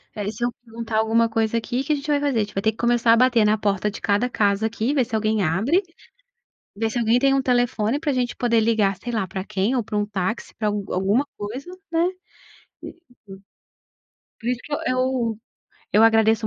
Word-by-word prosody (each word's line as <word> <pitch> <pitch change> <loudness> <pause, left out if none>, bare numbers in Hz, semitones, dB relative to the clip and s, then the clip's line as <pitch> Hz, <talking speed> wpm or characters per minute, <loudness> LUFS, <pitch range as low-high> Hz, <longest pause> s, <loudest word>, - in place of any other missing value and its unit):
Aí, 205 0 -3
se 240 - -6
eu 245 - -1
perguntar 230 -1 -5
alguma 225 +1 +3
coisa 225 0 0
aqui, 240 +2 -3
que - - -13
que 305 - +2
a - - +2
gente 285 +1 -7
vai 290 - +3
fazer? 285 -5 0
A - - +3
gente 205 - -9
vai 195 - -1
ter 220 - +2
que 220 - -22
começar 235 -1 +3
a - - +4
bater 245 -3 +4
na 215 +1 +3
porta 205 0 0
de 205 - -8
cada 215 +4 +1
casa 205 0 +1
aqui, 230 +5 -2
ver 260 -5 +2
se 220 - -4
alguém 215 -1 +1
abre, 215 - +2 1.0
ver 220 +1 -1
se 240 - -2
alguém 235 +1 +3
tem 275 0 +3
um 270 - +2
telefone 245 0 +1
para 295 -3 0
gente 250 -1 -1
poder 235 -2 +1
ligar 215 -4 +2
sei 240 +4 -6
lá 205 -5 -1
para 190 +1 -5
quem 215 +5 -1
ou 235 - 0
para 210 -1 -4
um 205 0 0
táxi, 205 +2 -3
para 215 -2 0
al 205 -1 -1
alguma 200 +9 +1
coisa, 240 +11 -6 0.2
né? 335 +2 +2 0.7
Por - - -7
isso 345 - -14 1.4
por 235 - -7
isso 250 -1 -1
que 295 - -7 0.2
eu 255 -4 0 0.6
eu 215 +2 +5
agradeço 225 -1 +4
225 Hz, 225 wpm, -23 LUFS, 210-245 Hz, 1.4 s, eu